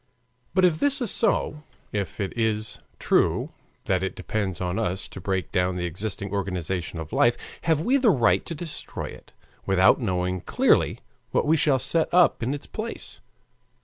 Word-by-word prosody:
But 185 -1 +5
if 160 -3 +2
this 285 -1 +2
is 240 -6 0
so, 150 -8 +1 0.3
if 100 -2 -3
it 100 -3 -3
is 110 -2 -1 0.2
true - - +1 0.3
that 95 -2 +1
it 95 - -3
depends 95 -1 -3
on 90 +3 -2
us 95 -3 -2
to 95 - -10
break 95 0 -2
down 90 -1 +1
the 90 -1 -2
existing 100 +3 -3
organization 90 -3 -2
of 80 -1 -7
life, 120 0 +4 0.3
have 160 -2 +2
we 255 +11 +3
the 255 -4 +4
right 125 - +3
to 165 - -4
destroy 160 0 -5
it, - - -13 0.4
without 95 +5 +5
knowing 90 -3 -1
clearly - - +2 0.3
what - - +1
we 155 +2 +4
shall 145 -3 +3
set 160 +5 +2
up 175 -7 +4
in 125 +5 -1
its 145 - -7
place? 225 +1 -6
105 Hz, 175 wpm, -25 LUFS, 95-155 Hz, 0.4 s, But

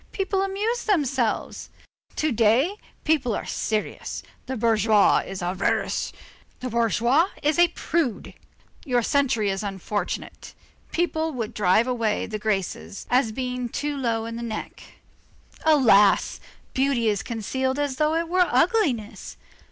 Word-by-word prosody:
people 390 0 0
amused 420 +5 -1
themselves. 270 - 0 0.5
To 310 -1 0
day, 240 - +3 0.3
people 280 -8 +1
are - - -4
serious. 215 -1 -3 0.2
The 260 0 -3
bourgeois 215 -2 +4
is 190 -2 -6
avaricious, 180 +2 -1 0.5
the 255 -1 -5
bourgeoise 235 - +2
is 300 +3 +2
a 345 - +7
prude; 315 -8 -2 0.5
your 245 -5 +1
century 250 -6 +1
is 195 - -3
unfortunate. 200 -1 -4 0.4
People 320 -2 0
would 230 -4 -4
drive 205 +3 +3
away 230 -4 0
the 215 -1 -5
Graces 190 - -3
as 245 -2 +3
being 250 0 -3
too 290 +4 -3
low 230 -4 -1
in 230 0 -5
the - - -5
neck. 230 -2 -6 0.8
Alas! 230 -10 +5 0.3
beauty 265 -4 +1
is 205 -2 +1
concealed 260 +4 -2
as 285 -3 -1
though 305 +1 +2
it 335 0 0
were 360 +1 +3
ugliness. 260 - 0
245 Hz, 130 wpm, -24 LUFS, 215-300 Hz, 0.8 s, a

